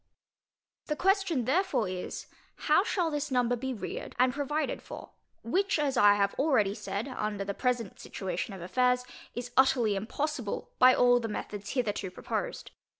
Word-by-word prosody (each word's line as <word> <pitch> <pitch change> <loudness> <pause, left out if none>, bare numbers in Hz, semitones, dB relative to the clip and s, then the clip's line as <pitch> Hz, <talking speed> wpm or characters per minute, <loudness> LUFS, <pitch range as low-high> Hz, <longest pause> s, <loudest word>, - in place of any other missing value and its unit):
The 300 - -1
question 375 - +1
therefore 340 - +1
is, 185 0 -5 0.3
How 305 +3 +3 0.3
this 295 0 -2
number 245 -2 +2
shall 245 - -2
be 265 +1 -3
reared 235 - -6
and 250 0 +3
provided 295 +2 -2
for? - - -10 0.3
which, 380 - +1
as 290 -3 0
I 205 -3 +6
have 200 -1 +1
already 260 -9 +3
said, 210 +1 -4
under 215 -6 -3
the 200 - -2
present 245 -3 -1
situation 190 +2 -4
of 180 - -8
affairs, 250 +6 +2 0.3
is 245 +1 -5
utterly 255 -5 +4
impossible 245 +3 -3
by 255 0 +8
all 245 0 +5
the 230 - -3
methods 205 -1 -5
hitherto 210 -6 -1
proposed. - - -4
245 Hz, 155 wpm, -29 LUFS, 205-280 Hz, 0.3 s, by